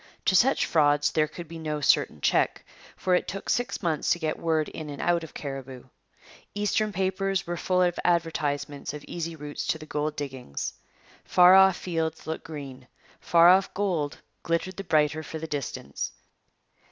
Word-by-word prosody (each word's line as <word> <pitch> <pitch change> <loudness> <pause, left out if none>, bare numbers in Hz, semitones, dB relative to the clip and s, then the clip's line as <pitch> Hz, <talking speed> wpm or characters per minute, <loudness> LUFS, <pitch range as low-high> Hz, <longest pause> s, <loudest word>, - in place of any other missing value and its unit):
To 190 - +3
such 265 +8 +4
frauds 145 -2 +3
there 155 -1 +2
could 170 +2 -9
be 165 +1 -8
no 155 -1 -3
certain 110 - +2
check; 65 - +1 0.3
for 185 - 0
it 180 - +2
took 195 - -3
six 245 -3 -1
months 160 -3 0
to - - +3
get 155 -2 -2
word 160 -2 +1
in 155 -2 -7
and 145 - -7
out 175 -1 +1
of 160 - -11
Cariboo. 135 -3 -7 0.7
Eastern 210 +1 0
papers 195 0 -1
were 175 - -3
full 180 +1 +1
of 175 -1 0
advertisements 150 -4 -1
of 150 - -8
easy 165 -1 -4
routes 150 -1 -6
to 175 -2 +1
the 155 - -10
gold 150 0 -2
diggings. 130 - -5 0.5
Far 180 0 +6
off 190 -2 +7
fields 160 -3 -3
look 160 0 -4
green. 135 -5 -9 0.3
Far 170 0 +6
off 190 +1 +4
gold 180 -7 -1 0.2
glittered 170 +3 -2
the 195 - -4
brighter 155 -2 +2
for 160 - -7
the 160 - -5
distance. 145 -4 -4
160 Hz, 175 wpm, -27 LUFS, 150-180 Hz, 0.7 s, off